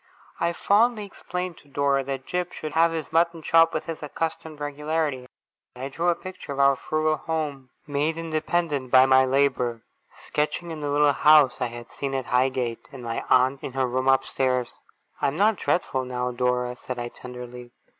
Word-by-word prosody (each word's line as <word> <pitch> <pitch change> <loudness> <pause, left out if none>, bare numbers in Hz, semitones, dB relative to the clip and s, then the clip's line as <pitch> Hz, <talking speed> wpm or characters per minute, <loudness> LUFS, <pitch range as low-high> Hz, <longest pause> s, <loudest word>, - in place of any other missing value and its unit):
I 170 - +1
fondly 210 +5 +2
explained 180 -3 -6
to - - -22
Dora 140 -1 +1
that 135 -1 -4
Jip 180 0 -3
should 155 -1 -6
have 165 +1 +4
his 160 -1 -5
mutton 165 0 +2
chop 165 +1 +5
with - - -3
his 165 -1 -6
accustomed 155 0 -4
regularity. 145 -2 -2 0.5
I 130 +2 -5
drew 170 +5 0
a 175 - +3
picture 185 -5 -9
of 140 - -4
our 140 0 +5
frugal 155 +3 0
home, 150 -5 -4 0.2
made 150 +3 -1
independent 155 -3 -1
by 130 +1 +7
my 130 0 +5
labour 130 -4 +1 0.4
sketching 150 +3 -2
in 155 -2 -6
the 145 - -2
little 145 0 +4
house 150 -3 +5
I 125 - +1
had 120 0 -10
seen 135 -1 -4
at 130 -2 -2
Highgate, 125 -2 0
and 135 -3 -9
my 115 -1 -3
aunt 130 +2 +3
in 130 - -6
her 135 -1 +1
room 130 +1 -1
upstairs. 130 -2 +1 0.4
'I - - +3
am 140 +3 -2
not 210 +1 +3
dreadful 135 -8 0
now, 125 0 -2
Dora?' 125 0 -1
said 125 0 -6
I, 120 0 -4
tenderly. 125 0 -10
140 Hz, 185 wpm, -25 LUFS, 130-160 Hz, 0.5 s, by